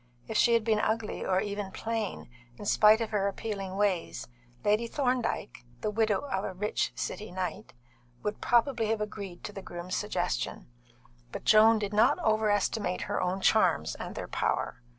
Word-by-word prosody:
If 220 - -5
she 235 +2 +5
had 230 - +2
been 215 -1 +2
ugly, 220 0 -1
or 185 0 +1
even 205 -1 -3
plain, 225 0 -3 0.3
in - - -8
spite 215 +2 +5
of 225 - -2
her 200 -2 +1
appealing 195 -2 -4
ways, 195 -4 -1 0.4
Lady 215 +3 +2
Thorndyke 250 - -1 0.2
(the 210 - -1
widow 215 -2 +1
of 200 -9 -3
a - - -4
rich 210 +3 -1
City 215 - -4
knight) 180 -11 -4 0.5
would 210 0 -3
probably 240 -1 +2
have 220 0 0
agreed 200 -4 -6
to 205 - -6
the 195 - -7
groom's 175 0 -5
suggestion; - - -2 0.7
but - - -7
Joan 220 +1 +7
did 210 -1 -3
not 215 +3 +4
overestimate 210 -3 +1
her - - -2
own 185 +2 -1
charms - - +3
and - - -7
their - - -5
power. - - -1
210 Hz, 170 wpm, -29 LUFS, 195-220 Hz, 0.7 s, Joan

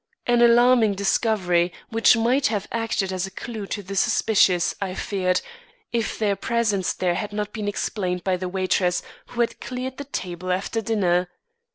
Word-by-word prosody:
An 240 -1 +3
alarming 240 -2 +5
discovery 190 -3 +1 0.2
which 225 0 +4
might 245 +5 +2
have 210 -2 -2
acted 225 -4 -1
as 185 0 -2
a - - -8
clew 210 +1 -7
to 205 - -4
the 195 +2 -7
suspicious 190 -3 +3
I 190 -2 -3
feared, 185 -3 0 0.5
if 230 -2 -1
their 205 -2 +1
presence 210 -3 0
there 180 -1 0
had 210 +3 -3
not 210 0 -4
been 210 -2 -4
explained 185 -3 -2
by 190 -1 +1
the 185 0 -4
waitress 185 -1 0 0.2
who 240 - -2
had 235 - -1
cleared 255 0 -5
the 285 - -6
table 185 -8 -4
after 195 +5 -1
dinner. 185 -5 +1
205 Hz, 170 wpm, -23 LUFS, 185-230 Hz, 0.5 s, alarming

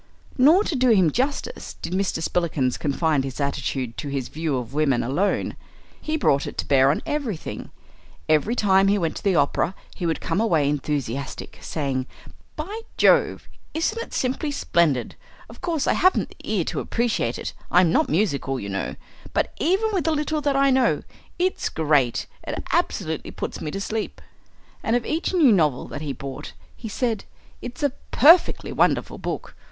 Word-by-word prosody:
Nor, 310 +10 +6
to 335 - -2
do 255 -1 +3
him 190 -8 +5
justice, 270 - -2
did 175 - -5
Mr. 185 -4 0
Spillikins 155 -8 0
confine 150 0 +1
his 135 0 -6
attitude 135 -3 -2
to 150 - -4
his 140 -3 -3
view 155 -3 -2
of 125 +1 -6
women 140 -5 +2
alone. 160 +12 0 0.5
He 315 0 -1
brought 140 - +2
it - - -7
to - - -1
bear 135 -1 +5
on 145 - 0
everything. 255 - -4 0.6
Every 155 +10 +2
time 195 -3 +4
he 200 +1 +3
went 165 -4 -1
to - - -8
the 195 -3 +2
opera 180 +2 +1 0.2
he 175 - -3
would 165 - 0
come 210 - -1
away 165 -11 +2
enthusiastic, 140 -2 -3
saying, 135 -4 -2 0.5
"By 400 +9 -5 0.2
Jove, - - +3 0.3
isn't 330 +8 0
it - - -8
simply 265 +4 -1
splendid! 165 - +1 0.3
Of 230 - -14
course 335 -5 -1
I - - +3
haven't 370 +1 +3
the - - -9
ear - - +2
to - - -3
appreciate 225 - -1
it - - -5 0.2
I'm 180 -2 +5
not - - +2
musical, 140 -6 0
you 100 - -5
know 100 0 -3 0.4
but - - 0
even 385 +8 +2
with 375 - 0
the 320 - +2
little 300 0 -1
that 285 -1 +1
I 275 0 +4
know, 260 -2 +2 0.3
it's 370 +1 0
great; 145 -6 +1 0.2
it - - -3
absolutely - - -1
puts - - -5
me - - -3
to 195 - -4
sleep." 215 +2 -3 0.6
And 225 - +1
of 245 - 0
each 320 +2 -1
new 325 -9 +5
novel 155 -10 +2
that - - -6
he 150 -2 -3
bought 135 0 -7 0.2
he 225 - -7
said, 225 -1 -1 0.4
"It's 245 +3 -7
a 285 - +3 0.2
perfectly 330 +6 +5
wonderful - - +1
book! - - -5
185 Hz, 180 wpm, -24 LUFS, -, 0.6 s, Nor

